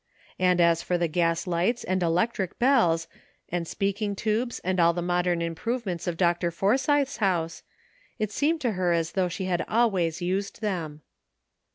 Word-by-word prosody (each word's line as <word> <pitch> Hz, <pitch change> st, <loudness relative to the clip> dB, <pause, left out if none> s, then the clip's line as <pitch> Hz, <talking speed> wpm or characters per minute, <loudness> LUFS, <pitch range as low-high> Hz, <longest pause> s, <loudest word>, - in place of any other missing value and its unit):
And 180 Hz, -1 st, +3 dB
as 170 Hz, -1 st, +4 dB
for 180 Hz, -, 0 dB
the 170 Hz, -1 st, +1 dB
gas 165 Hz, +1 st, 0 dB
lights 180 Hz, +7 st, 0 dB
and 185 Hz, 0 st, -1 dB
electric 180 Hz, +3 st, 0 dB
bells 225 Hz, -11 st, +3 dB, 0.4 s
and 170 Hz, -1 st, -2 dB
speaking 200 Hz, +2 st, -2 dB
tubes 225 Hz, +4 st, -1 dB
and 185 Hz, 0 st, 0 dB
all 170 Hz, 0 st, +5 dB
the 175 Hz, -, -3 dB
modern 175 Hz, -1 st, 0 dB
improve 230 Hz, +9 st, -3 dB
ments 180 Hz, -2 st, -4 dB
of 170 Hz, -2 st, -2 dB
Dr. 175 Hz, -1 st, +2 dB
Forsythe's 260 Hz, -, +1 dB
house, 175 Hz, -6 st, 0 dB, 0.6 s
it 215 Hz, -2 st, -2 dB
seemed 310 Hz, +7 st, 0 dB
to 245 Hz, -4 st, +1 dB
her 180 Hz, -3 st, +1 dB
as 165 Hz, 0 st, 0 dB
though 185 Hz, -2 st, 0 dB
she 185 Hz, +2 st, -4 dB
had 180 Hz, -1 st, 0 dB
always 190 Hz, -9 st, +1 dB
used 190 Hz, +3 st, -2 dB
them. 165 Hz, -8 st, -4 dB
180 Hz, 170 wpm, -26 LUFS, 170-215 Hz, 0.6 s, all